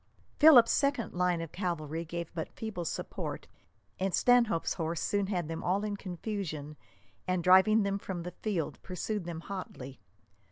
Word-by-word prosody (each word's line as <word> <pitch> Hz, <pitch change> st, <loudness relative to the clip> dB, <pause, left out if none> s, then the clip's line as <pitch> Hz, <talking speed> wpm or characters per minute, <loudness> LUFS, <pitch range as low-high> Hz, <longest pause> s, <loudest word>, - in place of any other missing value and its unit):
Philip's 280 Hz, -7 st, +8 dB
second 280 Hz, -5 st, +1 dB
line 180 Hz, -1 st, +1 dB
of 165 Hz, -2 st, -6 dB
cavalry 165 Hz, -4 st, -3 dB
gave 170 Hz, 0 st, -5 dB
but 160 Hz, -2 st, -4 dB
feeble 210 Hz, -6 st, -5 dB
support, -, -, -5 dB, 0.5 s
and 190 Hz, -1 st, +1 dB
Stanhope's 235 Hz, -8 st, +3 dB
horse 165 Hz, -1 st, -2 dB
soon 200 Hz, -1 st, 0 dB
had 180 Hz, -5 st, -2 dB
them 165 Hz, 0 st, -5 dB
all 195 Hz, +3 st, +1 dB
in 210 Hz, -1 st, -2 dB
confusion, 175 Hz, -6 st, -5 dB, 0.5 s
and, 185 Hz, -1 st, 0 dB
driving 190 Hz, +4 st, +6 dB
them 200 Hz, 0 st, -1 dB
from 180 Hz, -3 st, -5 dB
the 180 Hz, -, -5 dB
field, 190 Hz, -8 st, -2 dB
pursued 185 Hz, +2 st, -4 dB
them 165 Hz, -2 st, -5 dB
hotly. 150 Hz, -9 st, -7 dB
180 Hz, 155 wpm, -31 LUFS, 165-205 Hz, 0.5 s, Philip's